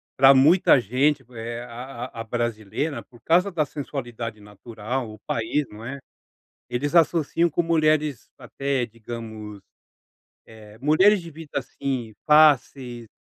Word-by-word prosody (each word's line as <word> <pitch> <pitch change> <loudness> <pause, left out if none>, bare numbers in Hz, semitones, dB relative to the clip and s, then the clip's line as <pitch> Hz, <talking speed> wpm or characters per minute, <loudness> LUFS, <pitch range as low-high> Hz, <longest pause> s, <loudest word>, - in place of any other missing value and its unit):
para 135 +1 +7
muita 145 +1 +6
gente, 130 +5 +1
eh, 115 0 -6
a 120 +1 -7
a 115 -3 -8
a - - -4
brasileira, 120 +5 -3
por 120 -3 -20
causa 180 +7 +3
da 155 -4 0
sensualidade 120 -7 -6
natural, 110 +4 -6
o 110 - -11
país, 125 +6 -1
não 105 +2 -11
é, 140 +3 -6 0.7
eles 140 +6 -2
associam 165 0 +3
com 175 - 0
mulheres, 155 -5 +1
até 135 -3 -2
digamos, 110 -2 -8 0.9
eh, 110 -1 -15
mulheres 185 +6 +4
de 165 - -10
vida, 160 0 -11
assim, 130 -3 -4
fáceis 135 -5 +3
130 Hz, 130 wpm, -24 LUFS, 115-150 Hz, 0.9 s, para